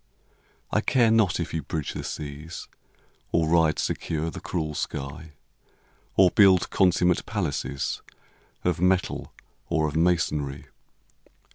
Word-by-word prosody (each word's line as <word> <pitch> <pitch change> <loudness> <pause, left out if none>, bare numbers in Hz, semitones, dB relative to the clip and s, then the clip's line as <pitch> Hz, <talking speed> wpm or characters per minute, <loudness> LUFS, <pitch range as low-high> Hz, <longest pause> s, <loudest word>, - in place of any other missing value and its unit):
I - - +2
care 120 -4 +3
not 110 -7 +3
if 85 - -3
you 80 - -1
bridge 75 +1 -4
the - - -5
seas, 75 +3 -6 0.6
Or 80 -1 +2
ride 80 -1 +3
secure 80 0 -2
the - - -7
cruel 80 -4 -3
sky, 75 +3 -5 0.8
Or 95 -2 +6
build 95 -5 +5
consummate 90 -2 +3
palaces 80 -9 -2 0.6
Of 90 -1 0
metal 90 0 +1 0.4
or 80 -2 +1
of 75 - -5
masonry. 75 -5 0
85 Hz, 120 wpm, -26 LUFS, 75-90 Hz, 0.8 s, Or